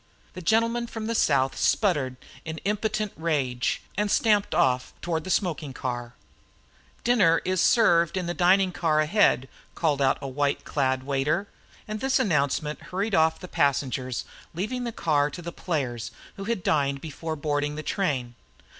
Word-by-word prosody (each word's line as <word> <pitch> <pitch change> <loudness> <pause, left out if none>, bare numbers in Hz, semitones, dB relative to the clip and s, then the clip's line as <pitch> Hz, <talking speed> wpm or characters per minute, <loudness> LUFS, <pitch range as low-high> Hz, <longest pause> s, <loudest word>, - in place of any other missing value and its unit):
The 180 - -7
gentleman 230 +5 +2
from 225 -1 -6
the 230 - -1
South 135 -11 +2
sputtered 145 - +1 0.3
in 160 0 -5
impotent 215 0 -1
rage 135 -7 -1
and 210 +1 0
stamped 210 -1 +2
off 125 -1 +1
toward 160 -2 -2
the - - -5
smoking 160 -7 -1
car. 120 -2 -4 0.9
"Dinner 195 -9 +4 0.2
served 175 -5 +4
in 180 - -1
the 175 - -2
dining 185 +1 +4
car 160 -3 +1
ahead," 155 - +3 0.3
called 150 -4 +1
out 135 -1 +3
a 140 - -6
white 140 +1 -1
clad 130 -3 0
waiter; 140 +8 0 0.4
and 215 0 -4
this 265 +3 +2
announcement 150 -3 0
hurried 195 +4 -2
off 160 -2 +3
the 180 - -8
passengers, 135 -5 0 0.3
leaving 245 +8 -2
the 235 - -2
car 150 -8 +1
to 175 - -8
the 170 - -5
players, 130 -11 -3 0.3
who 195 - -7
had 230 -5 -2
dined 140 -2 +1
before 160 +2 -5
boarding 145 0 -1
the 155 - -5
train. 135 - -1
160 Hz, 155 wpm, -26 LUFS, 140-195 Hz, 0.9 s, Dinner